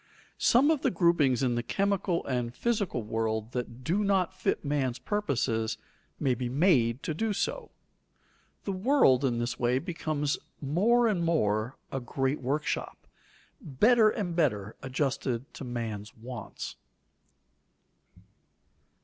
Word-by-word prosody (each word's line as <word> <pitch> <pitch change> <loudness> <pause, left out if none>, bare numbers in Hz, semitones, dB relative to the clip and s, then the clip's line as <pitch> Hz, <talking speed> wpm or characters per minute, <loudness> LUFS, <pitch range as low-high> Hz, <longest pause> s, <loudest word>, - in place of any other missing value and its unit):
Some 270 +6 +5
of 305 -4 +1
the - - +2
groupings 165 -7 +3
in 125 -2 +2
the 120 - 0
chemical 195 - 0
and 125 -2 -2
physical 205 - -1
world 110 +1 -2
that 125 0 -5
do 185 +8 +1
not 190 -3 +1
fit 185 - -1
man's 135 -4 0
purposes 115 - -1 0.4
may 135 -4 +2
be 125 0 -3
made 130 -5 +3
to 155 - -2
do 215 +7 -1
so. - - -2 0.9
The 200 - -2
world 190 - +4
in 125 -3 +1
this 120 0 -2
way 125 +1 +2
becomes 155 -2 -2 0.2
more 215 - +3
and 190 -6 +1
more 115 -8 +1
a 135 - -2
great 135 +3 -2
workshop, 145 +4 -2 0.6
better 215 - +4
and 195 -6 -3
better 110 - 0
adjusted 130 -2 -2
to - - -8
man's 115 -4 -5
wants. 120 +1 -7
140 Hz, 130 wpm, -29 LUFS, 120-185 Hz, 0.9 s, Some